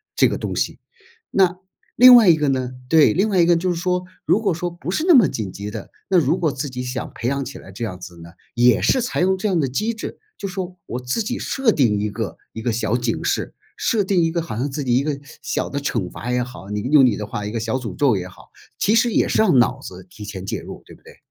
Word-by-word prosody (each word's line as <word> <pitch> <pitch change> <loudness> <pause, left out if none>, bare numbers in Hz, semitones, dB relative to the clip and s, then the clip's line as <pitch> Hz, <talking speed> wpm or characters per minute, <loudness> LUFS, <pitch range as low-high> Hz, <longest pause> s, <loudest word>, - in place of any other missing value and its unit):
这 - - +5
个 - - -2
东 - - -4
西。 - - -1 0.5
那 185 -2 +3 0.4
另 250 +1 +9
外 220 -6 +7
一 165 - +7
个 150 -2 -1
呢 130 -1 -1 0.2
对， 160 -2 +6
另 195 +4 +2
外 190 -3 +1
一 170 - +4
个 175 - +5
就 180 +2 -1
是 - - -2
说， 180 +1 -1 0.2
如 210 - +3
果 200 -6 0
说 175 +2 -3
不 175 +1 -6
是 310 - -1
那 345 - +7
么 245 - +7
紧 100 -4 -4
急 105 +1 -7
的， 110 -3 -7 0.2
那 185 - +4
如 160 +4 +1
果 160 -5 0
自 140 +1 -4
己 125 0 -5
想 125 0 -5
培 120 - -3
养 140 +1 -1
起 130 - -8
来 95 - -12
这 115 +5 -7
样 95 -5 -5
子 90 -2 -11
呢， 85 - -11 0.2
也 120 +1 +4
是 260 - +3
采 245 - -2
用 190 +1 +3
这 195 +3 -2
样 180 -4 +1
的 135 - +1
机 215 - -2
制， 225 - -7 0.2
就 200 - -4
说 185 -1 -6
我 125 - -4
自 125 - -2
己 245 +4 -3
设 265 -5 +1
定 115 - +2
一 105 0 -2
个 110 -4 -5 0.2
一 110 - -6
个 120 0 -1
小 115 0 -1
警 120 -2 -2
示， - - -2 0.2
设 220 -3 +1
定 190 -2 +1
一 165 - +2
个 170 0 -1
好 110 - -6
像 140 +4 -1
自 145 +1 -4
己 120 -2 +1
一 130 - +3
个 145 -1 -2 0.2
小 - - -2
的 140 - -2
惩 115 -9 -2
罚 120 - -7
也 125 0 +1
好， 120 -5 -10
你 105 0 -2
用 135 +3 +5
你 115 -5 +2
的 105 - -4
话 105 0 -5
一 - - -5
个 115 - -2
小 115 +3 -1
诅 110 -7 -6
咒 135 -7 +3
也 90 -1 -4
好， 90 - -17 0.3
其 210 - +2
实 230 +1 +3
也 - - +2
是 - - +2
让 180 -11 +4
脑 130 +2 +2
子 95 -5 -10
提 105 +3 -12
前 100 -2 -7
介 - - -3
入， - - -10
对 - - -14
不 - - -24
对？ - - -16
140 Hz, 300 characters per minute, -21 LUFS, 115-180 Hz, 0.5 s, 另